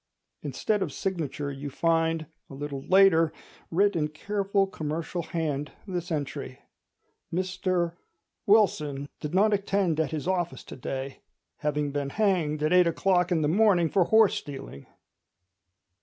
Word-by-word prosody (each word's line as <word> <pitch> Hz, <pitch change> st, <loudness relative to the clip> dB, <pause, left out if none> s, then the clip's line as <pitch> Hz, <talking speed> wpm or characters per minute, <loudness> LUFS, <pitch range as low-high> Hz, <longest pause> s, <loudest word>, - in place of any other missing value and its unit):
Instead 155 Hz, -, -1 dB
of 175 Hz, -6 st, -1 dB
signature 150 Hz, -5 st, -3 dB
you 140 Hz, +1 st, -6 dB
find, 165 Hz, +2 st, +1 dB, 0.2 s
a 135 Hz, -, -9 dB
little 140 Hz, -1 st, -5 dB
later, 185 Hz, -4 st, +5 dB, 0.4 s
writ 200 Hz, +3 st, +2 dB
in 155 Hz, -2 st, +1 dB
careful 195 Hz, +5 st, 0 dB
commercial 165 Hz, -1 st, -4 dB
hand, 150 Hz, -4 st, -3 dB
this 180 Hz, -3 st, -4 dB
entry: 140 Hz, -3 st, -4 dB, 0.7 s
"Mr— 185 Hz, -1 st, 0 dB, 1.3 s
did 150 Hz, +4 st, -4 dB
not 210 Hz, +3 st, +4 dB
attend 195 Hz, -5 st, +1 dB
at 160 Hz, -, +1 dB
his 155 Hz, +1 st, -4 dB
office 175 Hz, -2 st, -1 dB
to -, -, -10 dB
day, 135 Hz, +1 st, -5 dB, 0.4 s
having 150 Hz, -1 st, -1 dB
been 140 Hz, -1 st, -2 dB
hanged 165 Hz, -6 st, +1 dB
at 155 Hz, +3 st, +2 dB
eight 180 Hz, -1 st, +6 dB
o'clock 180 Hz, +1 st, +2 dB
in 160 Hz, -3 st, +2 dB
the -, -, +2 dB
morning 180 Hz, -1 st, +4 dB
for 185 Hz, -3 st, +3 dB
horse 220 Hz, 0 st, +5 dB
stealing." 135 Hz, -, -7 dB
165 Hz, 135 wpm, -27 LUFS, 150-190 Hz, 1.3 s, eight